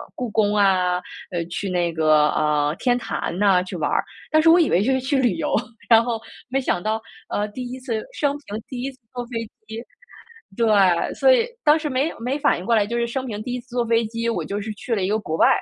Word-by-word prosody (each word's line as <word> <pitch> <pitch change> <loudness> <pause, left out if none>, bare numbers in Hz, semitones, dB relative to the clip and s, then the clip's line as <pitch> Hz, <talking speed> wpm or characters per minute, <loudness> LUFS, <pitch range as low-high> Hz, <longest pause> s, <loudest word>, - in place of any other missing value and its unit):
故 250 -2 -3
宫 210 -1 +2
啊， 185 -3 +3 0.3
呃， 175 -2 -1
去 195 +3 -3
那 175 -2 0
个， 155 -1 +4
呃， 150 0 +1
天 245 -1 +2
坛 180 -7 -4
呐 195 -2 +4
去 185 0 -7
玩 150 -3 -1
儿。 - - +2 0.3
但 310 0 +5
是 325 - +5
我 340 +2 +7
以 330 - +3
为 175 - +3
就 260 - +1
是 260 - +2
去 265 +2 0
旅 245 -8 +2
游， 165 - -2 0.4
然 225 -1 +7
后 230 -1 -2 0.3
没 265 +2 +1
想 215 -9 -1
到 220 +3 -1 0.3
呃， 210 - -1
第 250 +3 -6
一 260 - -6
次 235 -4 -3
生 285 -2 0
平 220 -7 -7
第 255 -2 -6
一 270 +2 -3
次 260 - -22 0.2
坐 245 -1 -4
飞 235 -2 -4 0.3
机。 220 +1 -6 0.7
对， 230 - +2 0.5
所 - - +5
以 475 -2 +2 0.2
当 300 0 +5
时 310 -1 -3
没 275 +4 0
没 250 +4 -2
反 - - +2
应 - - -7
过 230 - +3
来， 210 -2 +3
就 235 - -3
是 235 0 0
生 260 +2 -3
平 215 -4 -5
第 245 - -4
一 - - -3
次 245 - -30
坐 245 0 0
飞 230 0 +2
机， 230 +1 -2
我 230 - -2
就 205 +1 -3
是 220 +2 -5
去 235 +3 -4
了 200 - -1
一 185 - 0
个 215 - +2
国 160 -7 -4
外。 - - +5
230 Hz, 275 characters per minute, -22 LUFS, 195-255 Hz, 0.7 s, 我